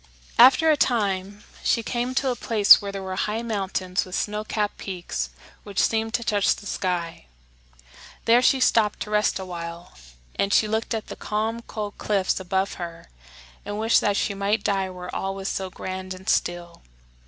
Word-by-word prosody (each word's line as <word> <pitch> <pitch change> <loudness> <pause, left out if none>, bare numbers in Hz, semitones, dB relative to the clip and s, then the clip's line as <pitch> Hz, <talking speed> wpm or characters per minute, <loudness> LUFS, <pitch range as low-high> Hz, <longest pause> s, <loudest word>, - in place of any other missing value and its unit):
After 265 +6 +7
a - - +4
time 205 -6 0 0.2
she 230 - +2
came 245 +2 -2
to 265 -1 +1
a - - -2
place 215 -4 +6
where 200 -1 -4
there 195 -1 -6
were 190 0 -4
high 215 +4 -1
mountains 195 -4 -1
with 185 0 -6
snow 210 0 -2
capped 210 -1 -2
peaks 175 - -4 0.3
which 200 -1 -11
seemed 225 0 +1
to 235 - -1
touch 205 -2 +2
the - - -12
sky. 175 - -3 1.0
There 235 +2 +6
she 265 +1 +4
stopped 220 -4 +2
to 210 - -5
rest 210 -1 +2
a 190 - -6
while; 170 -1 -7 0.4
and 200 - +1
she 215 - +4
looked 220 +2 -1
up 220 - -3
at - - -30
the - - -6
calm, 220 +2 -2
cold 210 -3 -6
cliffs 195 -3 0
above 190 +1 -1
her 170 - -8 0.5
and 205 0 -5
wished 225 +1 +3
that 205 -1 +1
she - - 0
might 200 +2 0
die 195 -2 0
where 180 -1 -8
all 195 0 -2
was 195 0 -4
so 190 -1 -3
grand 185 0 -6
and 185 +1 -14
still. 175 -1 -1
200 Hz, 190 wpm, -24 LUFS, 185-220 Hz, 1.0 s, After